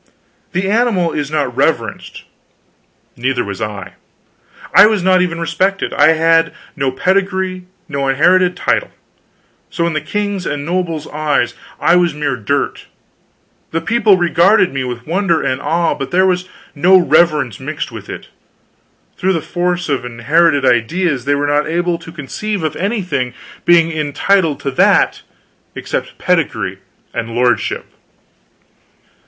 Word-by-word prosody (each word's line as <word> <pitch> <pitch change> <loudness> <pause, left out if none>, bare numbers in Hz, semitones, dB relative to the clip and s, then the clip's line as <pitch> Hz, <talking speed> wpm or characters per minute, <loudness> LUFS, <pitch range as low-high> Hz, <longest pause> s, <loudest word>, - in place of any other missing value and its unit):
The 185 +2 -1
animal 205 -6 +1
is 145 -2 -3
not 150 -2 -1
reverenced, - - -1 0.9
neither 125 0 -1
was 100 0 -6
I; 100 -4 -5 0.8
I - - +8
was 215 -4 0
not 185 0 +4
even 170 -2 -1
respected. 190 +3 -1
I 160 - +5
had 165 0 +2 0.2
no 135 -2 -1
pedigree, 185 +3 -1 0.2
no 140 -3 -2
inherited 180 +6 +3
title; - - 0 0.8
so 170 - -1
in 170 - -1
the 155 - -1
king's 205 +2 -3
and 145 -1 -3
nobles' 170 -3 -2
eyes 150 -5 0 0.3
I 175 - +4
was 175 -3 +1
mere 145 -3 -1
dirt; 110 -5 -2 0.8
the 165 - -1
people 220 -1 +3
regarded 175 +2 +3
me 135 -1 -2
with 120 -1 -6
wonder 170 0 +1
and 130 - -1
awe, 170 0 +1
but 135 - -5
there 185 +1 +3
was 185 0 0 0.2
no 180 +6 +5
reverence 155 - +2
mixed - - -5
with - - -10
it; - - -8 0.9
through 190 +1 +1
the 165 - 0
force 175 +2 -2
of 140 -4 -1
inherited 140 +5 +2
ideas 130 +4 +1
they 145 +1 +2
were 145 0 -1
not 145 +1 +1
able 170 +1 -1
to 165 - -11
conceive 170 +6 -4
of 155 - -2
anything 180 - -2 0.3
being 165 -1 +4
entitled 155 +2 +1
to 140 - -2
that 130 - +3 0.5
except - - -4
pedigree - - -1 0.3
and 115 0 -4
lordship. 120 -1 0
165 Hz, 140 wpm, -16 LUFS, 140-185 Hz, 0.9 s, I